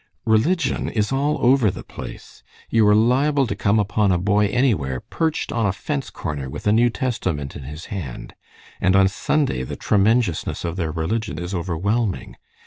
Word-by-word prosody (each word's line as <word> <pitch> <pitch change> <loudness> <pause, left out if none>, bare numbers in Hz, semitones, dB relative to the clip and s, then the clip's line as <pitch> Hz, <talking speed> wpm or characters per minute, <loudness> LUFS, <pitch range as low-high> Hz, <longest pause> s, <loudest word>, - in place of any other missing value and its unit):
Religion 140 +9 +1
is 105 0 -1
all 140 +3 +1
over 125 -3 +5
the - - -6
place. - - -10 0.3
You 110 -2 +4
are 105 - +6
liable 135 +6 +3
to 100 - -3
come 100 +2 +2
upon 105 -1 +2
a 90 - +3
boy 105 +3 +2
anywhere 100 - +1
perched 160 -1 -2
on 115 -3 +1
a - - +2
fence 140 +7 -4
corner 75 -6 -5
with - - -8
a 105 - +4
New 120 +3 +4
Testament 95 - -3
in 70 - -8
his 75 +5 -8
hand, 80 -11 -6 0.5
and 95 0 +3
on 95 0 +6
Sunday 125 - 0
the 65 - -5
'tremenjousness' 105 -4 +1
of 85 0 -3
their 85 -4 -2
religion 90 +4 -2
is 90 +3 -5
overwhelming. 95 +5 -1
105 Hz, 175 wpm, -22 LUFS, 85-120 Hz, 0.5 s, are